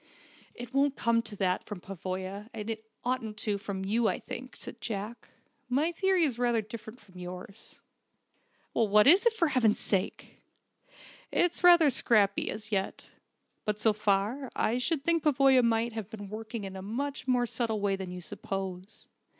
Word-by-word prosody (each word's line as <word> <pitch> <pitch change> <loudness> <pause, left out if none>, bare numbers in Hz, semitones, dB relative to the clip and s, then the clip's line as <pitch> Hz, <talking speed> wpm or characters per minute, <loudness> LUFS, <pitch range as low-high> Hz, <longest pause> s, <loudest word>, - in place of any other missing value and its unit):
"It 245 +1 -9
won't 275 0 +2
come 230 0 +2
to 215 -2 -8
that, 185 -2 0
from 205 -3 -7
Pavoya, 190 +3 -6
and 220 0 -4
it 220 0 -7 0.2
oughtn't 230 -4 -2 0.2
from 195 -2 -4
you, 225 +3 +2
I - - 0
think," - - -8
said - - -10
Jack. 215 +1 -5 0.4
"My 290 +7 +2
theory 375 0 +2
is 255 -6 0
rather 240 -2 +2
different 220 +2 -8
from 185 -5 -15
yours." 180 +3 -9 1.0
"What 210 -1 +4
is 370 - +7
it, 465 - +3
for 340 -8 +1
heaven's 235 -6 +2
sake?" 195 -1 -2 0.9
"It's 350 0 +1
rather 345 -4 +7
scrappy 205 -5 +3
as 215 0 -5
yet. 195 -2 -2 0.5
But 210 -1 -1
so 215 0 +3
far, 210 +6 0
I 235 +3 +1
should 275 +3 0
think 335 +1 +3
Pavoya 270 -3 +5
might 230 0 +1
have 220 -3 -5
been 205 -3 -8
working 220 +1 -6
in 195 -1 -6
a 190 - -6
much 260 +7 -4
more 250 -1 +3
subtle 230 -2 -1
way 200 -1 +1
than 190 -1 -6
you 180 0 -7
suppose. 190 +2 -6
220 Hz, 165 wpm, -29 LUFS, 200-255 Hz, 1.0 s, is